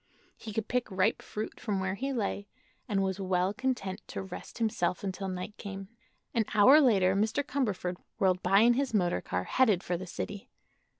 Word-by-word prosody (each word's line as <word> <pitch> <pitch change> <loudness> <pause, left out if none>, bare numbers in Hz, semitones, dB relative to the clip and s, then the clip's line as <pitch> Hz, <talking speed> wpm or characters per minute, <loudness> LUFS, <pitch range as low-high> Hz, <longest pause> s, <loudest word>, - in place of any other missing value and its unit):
He 220 - -8
could 215 +1 -2
pick 250 -2 -1
ripe 190 +3 +1
fruit 215 +1 -6
from 205 -4 -1
where 190 0 -1
he 270 +7 -3
lay, 205 -4 -2 0.4
and 195 -2 +1
was 190 0 -2
well 185 0 +1
content 240 -6 -2
to - - -5
rest 190 -2 -9
himself 205 -6 0
until 195 0 -3
night 185 +2 -5
came. 195 -1 -7 0.4
An 225 -2 +2
hour 265 +9 +8
later 195 -8 +4
Mr. 220 +7 +1
Cumberford 205 -11 -2 0.2
whirled 185 -1 +2
by 195 +3 +4
in 240 +1 +6
his 265 -2 0
motor 175 -4 +1
car, 90 - -2
headed 215 - +2
for 175 - -1
the 185 +2 -7
city. 200 +3 -6
200 Hz, 185 wpm, -30 LUFS, 185-225 Hz, 0.4 s, hour